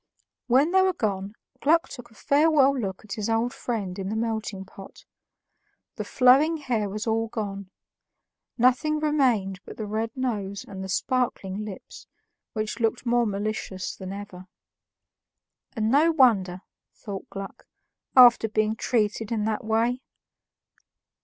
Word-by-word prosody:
When 270 +7 +4
they 380 0 +5
were 375 -1 +2
gone, 200 - -2 0.3
Gluck 330 +3 +3
took 245 -3 -10
a 225 - -22
farewell 280 +1 +3
look 200 -5 -4
at 200 - -6
his 215 0 -3
old 225 +2 0
friend 200 -6 -4
in 190 0 -3
the 215 - -2
melting 220 -3 -3
pot. 195 +1 -13 0.9
The - - -2
flowing 275 +6 +4
hair 235 -8 -1
was 210 +2 -4
all 225 0 0
gone; 200 -3 -5 0.9
nothing 255 +5 +3
remained 250 -11 +1
but - - -11
the 215 - -4
red 220 +2 -2
nose 205 -6 -3
and 190 -1 -7
the 190 - -7
sparkling 215 -3 -1
eyes, 190 - -11 0.5
which 215 0 -3
looked 225 +2 0
more 240 -1 +2
malicious 200 -2 -4
than 190 -1 -7
ever. 195 -2 -9 1.3
"And 220 -1 0
no 305 +5 +5
wonder," 200 - +3 0.3
thought 200 -3 -8
Gluck, 195 0 -8 0.5
"after 240 -3 +7
being 215 0 +1
treated 220 -1 -1
in 220 -2 0
that 220 +3 -2
way." 230 +3 0
220 Hz, 140 wpm, -25 LUFS, 200-250 Hz, 1.3 s, after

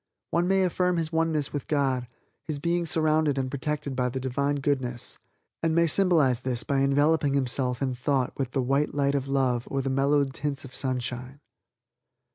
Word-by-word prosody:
One 170 +2 +1
may 190 0 +3
affirm 180 0 +1
his 165 -1 -1
Oneness 160 -3 0
with 145 - -4
God, 135 -4 0 0.3
his 155 -3 -4
being 170 +3 0
surrounded 155 -3 +2
and 130 -1 -1
protected 145 0 -3
by 125 0 0
the 130 +2 -4
divine 140 +3 -1
Goodness, 130 -4 -2 0.4
and 165 -1 +1
may 170 0 +4
symbolize 160 -8 +3
this 125 -2 -1
by 140 -2 0
enveloping 145 +1 +2
himself 130 -1 0
in 130 -1 0
thought 125 +1 0
with 135 -3 -2
the 130 0 -1
white 140 +4 0
light 140 -1 +2
of 140 -1 -1
love 130 -3 0
or 135 -1 -1
the 135 - -1
mellowed 140 0 +2
tints 140 -1 -3
of 130 - -12
sunshine. 130 0 -3
140 Hz, 180 wpm, -27 LUFS, 130-155 Hz, 0.4 s, may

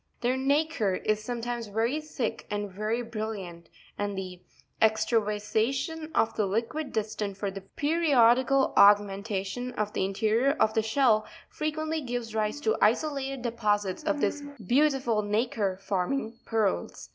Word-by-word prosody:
Their 245 +1 +1
nacre 275 -6 +1
is 215 +2 -1
sometimes 240 0 -4
very 230 +8 0
thick 285 -7 -4
and 205 -1 -3
very 215 +5 -2
brilliant; 210 -7 -6 0.3
and 205 -1 -2
the 185 -2 -6 0.4
extravasa 220 0 +2
tion 320 +3 -4
of 225 - +2
the 210 - +1
liquid 235 +9 -2
destined 210 -2 -3
for 200 -1 -2
the 195 0 -7
periodical 270 - +3
augmentation 205 +3 +3
of 210 -2 -2
the - - 0
in 195 +1 -1
terior 230 +8 +2
of 220 - +3
the 220 - +2
shell, 220 -1 +2 0.2
frequently 310 +1 -2
gives 245 -3 -4
_ - - -8
rise 215 +5 0
to 440 +8 +2
isolated 275 -4 +1
deposits 210 -3 0
of 300 -2 -1
this 295 - 0
Fig. 285 - -9
96.—MELEAGRINA 210 -6 -13
beautiful 265 -4 +2
nacre, 210 -2 -1
forming 210 +5 -2
pearls. 215 - -1
225 Hz, 150 wpm, -28 LUFS, 205-270 Hz, 0.4 s, periodical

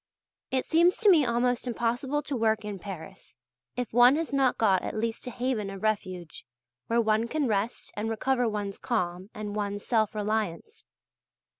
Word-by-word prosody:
It 260 -1 0
seems 340 +3 +4
to 425 -3 +5
me 310 -6 +5
almost 245 +1 0
impossible 245 +5 -1
to 285 - -3
work 220 -2 +1
in 205 -2 -5
Paris, 190 - -9 0.4
if 245 -2 -4
one 245 +3 +7
has 320 -1 -2
not 270 -2 +2
got 195 -5 +3
at - - -4
least 230 +3 -3
a - - -1
haven 240 -4 -2
of 195 0 -8
refuge, 185 -6 -2 0.4
where 230 +1 +2
one 220 0 +2
can 290 +2 0
rest 215 +2 -2
and 215 +2 -2
recover 245 +2 +1
one's 205 -2 -4
calm 185 -4 -2
and 210 -1 -5
one's 205 -1 -3
self 220 -3 +1
reliance. 215 - -3
225 Hz, 170 wpm, -28 LUFS, 205-250 Hz, 0.4 s, one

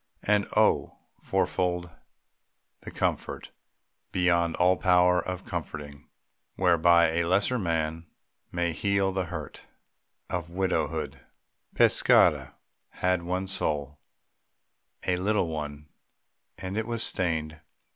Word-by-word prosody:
And 105 -1 +2
oh, - - +2 0.2
fourfold 90 -1 -1 0.9
The - - -9
comfort, - - -3 0.6
beyond 85 -2 +2
all 90 +1 +4
power 90 +1 +3
of 90 0 -5
comforting, 75 -7 -7 0.5
Whereby 85 -2 +4
a 85 +1 0
lesser 100 +8 +1
man 80 -2 -2 0.4
may 85 -1 -1
heal 100 +2 +1
the 95 -1 -2
hurt 80 -4 -8 0.6
Of 85 -2 -4
widowhood! 95 +1 -2 0.6
Pescara - - +4 0.3
had 90 -1 0
one 90 +2 -2
soul 75 -6 -2 1.1
A 90 - +1
little 100 0 +1
one; 75 -1 -6 0.7
and 95 +3 -4
it 110 - -3
was 115 -1 0
stained. 80 -3 0
90 Hz, 105 wpm, -27 LUFS, 80-95 Hz, 1.1 s, all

